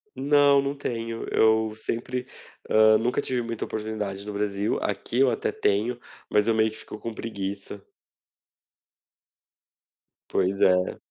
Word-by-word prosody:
Não, 140 0 +4
não 140 +1 -2
tenho. 115 -4 -4
Eu 110 0 +3
sempre, 125 +3 -4 0.4
ah, 110 0 +6
nunca 120 +2 0
tive 125 -1 -1
muita 115 -1 -4
oportunidade 105 -2 -4
no 105 - -5
Brasil 100 0 -1
aqui 105 +5 -2
eu 135 -2 +5
até - - -1
tenho, 110 +5 0 0.3
mas 105 +1 +2
eu 115 - +4
meio 110 0 +3
que - - -11
fico 105 - -9
com 115 - -5
preguiça. 100 -2 -6 2.5
Pois 95 +2 0
é. 90 0 +3
110 Hz, 135 wpm, -26 LUFS, 105-120 Hz, 2.5 s, ah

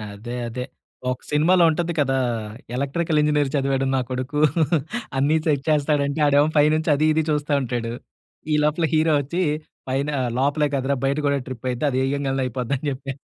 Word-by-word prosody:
అదే, 120 +4 -7
అదే. 125 +2 -4 0.5
ఒక 125 - -4
సినిమాలో 170 +5 +4
ఉంటది 170 +2 -1
కదా! 135 -2 +2 0.6
ఎలక్ట్రికల్ 150 +4 0
ఇంజినీర్ 150 -2 +2
చదివాడు 135 -1 +1
నా 130 - +2
కొడుకు 130 +3 -3 0.8
అన్నిసెట్ 150 0 +2
చేస్తాడు 150 -1 +2
అంటే 140 +2 -3
ఆడేమో 145 +1 +4
పైనుంచి 155 +2 +3
అది 150 +2 +1
ఇది 160 0 +1
చూస్తా 150 -1 0
ఉంటాడు. 120 -2 -3 0.6
ఈ - - +4
లోపల 155 +2 +1
హీరో 155 0 +3
వచ్చి 170 +7 -3 0.5
పైన 135 +3 0 0.3
లోపలే 145 +2 +2
కదరా 135 +1 0
బయట 140 +2 +1
కూడా 140 0 +2
ట్రిప్ 130 -1 -8
అయితే 125 +2 -4
అది 130 - -1
ఏయంగాల్నే 135 -1 -1
అయిపోద్ది 125 +1 -3
అని 145 - -9
చెప్పా. 135 0 -5
140 Hz, 165 wpm, -23 LUFS, 135-150 Hz, 0.8 s, సినిమాలో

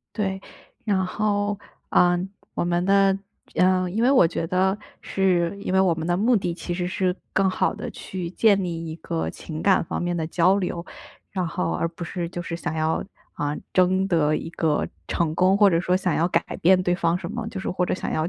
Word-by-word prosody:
对， 195 -3 -1 0.4
然 195 -4 +1
后， 205 +1 0 0.3
呃 175 0 +4 0.4
我 - - -1
们 175 0 +1
的 195 0 +4 0.4
呃 185 0 +3
因 215 +5 -1
为 250 - +5
我 255 -12 +6
觉 165 - -3
得， 190 +3 +1 0.2
是 185 -1 +1
因 - - -2
为 190 - +4
我 185 -3 +3
们 160 0 -4
的 175 0 +1
目 235 +4 +3
的 180 -4 -1
其 175 +1 -5
实 175 0 -2
是， 185 0 0 0.2
更 195 0 +3
好 185 - 0
地 - - -6
去 180 -2 -6
建 200 +1 +3
立 165 -2 -4
一 160 - -5
个 80 - -3
情 155 - -7
感 195 -2 +4
方 - - -3
面 175 0 -1
的 160 -2 -2
交 180 +4 +3
流， 175 -3 -3 0.5
然 185 -3 -2
后 85 - -2
而 165 - 0
不 170 +1 -8
是 170 0 -4
就 175 0 -5
是 170 - -5
想 170 -1 -4
要， 160 0 0 0.4
呃 145 0 -1 0.2
争 185 +1 +3
得 155 -5 +2
一 165 - -5
个 160 -3 0 0.2
成 160 -2 0
功， 185 +3 +4
或 205 -1 +6
者 165 -1 +2
说 180 +1 +2
想 185 -3 0
要 170 - +2
改 - - +2 0.2
变 185 +2 +5
对 175 -1 +1
方 170 -1 +1
什 180 0 -6
么， 230 0 -4
就 225 -3 -6
是 190 - -3
或 180 0 0
者 - - 0
想 - - -4
要 155 +1 0
180 Hz, 235 characters per minute, -24 LUFS, 170-190 Hz, 0.5 s, 我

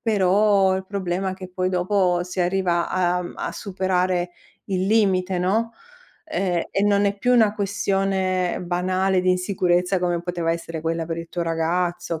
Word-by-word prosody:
Però 200 -2 +3
il 190 - -6
problema 190 -1 -2
è 185 - -5
che 185 -1 -9
poi 185 0 -1
dopo 180 -1 +1
si 180 +1 -4
arriva 175 -1 +1
a 180 -1 +1
a - - -3
m 175 - -8
a - - -4
superare 185 -2 -1 0.4
il 190 -1 -1
limite, 195 -4 +2
no, 220 +6 0 0.5
ehm, 185 - -1
e 195 - 0
non 205 0 +3
è 200 - 0
più 250 +4 +2
una 220 -4 +4
questione 195 -2 0
banale 185 +1 0
di 185 - +2
insicurezza 180 0 +1
come 175 -1 -1
poteva 175 -2 -1
essere 165 -1 -5
quella 165 +1 -2
per 165 - -3
il 165 0 -7
tuo 175 - -3
ragazzo, 165 0 -1
185 Hz, 170 wpm, -23 LUFS, 175-195 Hz, 0.5 s, una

